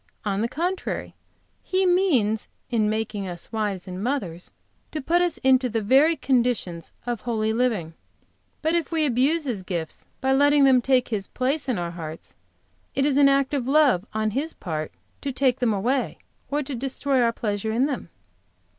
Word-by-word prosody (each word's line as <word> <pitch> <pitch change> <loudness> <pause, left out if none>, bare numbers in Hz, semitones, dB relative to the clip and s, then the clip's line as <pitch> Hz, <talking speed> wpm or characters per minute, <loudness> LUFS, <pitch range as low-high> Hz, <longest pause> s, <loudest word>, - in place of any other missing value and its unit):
On 200 0 0
the 230 - +1
contrary, 355 +7 -3 0.5
He 375 0 0
means, 290 - +2 0.2
in 220 -3 +2
making 215 -2 -2
us 175 -1 -7
wives 205 -4 -2
and 185 +1 -5
mothers, 195 -10 -3 0.4
to 310 - -3
put 340 +6 +2
us 350 -2 0
into 260 -1 +4
the 225 -1 -1
very 275 +9 +5
conditions 240 - 0
of 240 -2 -3
holy 220 -2 0
living. 220 -9 0 0.7
But 320 +1 +2
if 340 -1 0
we 320 -2 +2
abuse 280 +5 +2
His 240 -9 -2
gifts 175 -4 -5
by 265 0 +2
letting 285 +1 +5
them 260 -2 +6
take 255 0 +2
His 205 -4 -2
place 275 +3 -1
in 245 - +1
our 170 -1 -3
hearts, 160 -2 -8 0.6
it 275 - +2
is 285 -2 +2
an 280 0 +6
act 275 0 +2
of 260 -4 -1
love 275 - +4
on 215 0 -1
His 295 +8 -2
part 155 -4 -4 0.3
to 280 - -2
take 260 -1 +1
them 245 -3 +2
away, 245 +7 0 0.3
or 295 +1 0
to 275 +1 -5
destroy 270 +1 0
our 235 -1 +3
pleasure 215 -1 -2
in 240 +4 +2
them. 285 -2 -4
250 Hz, 180 wpm, -24 LUFS, 210-280 Hz, 0.7 s, them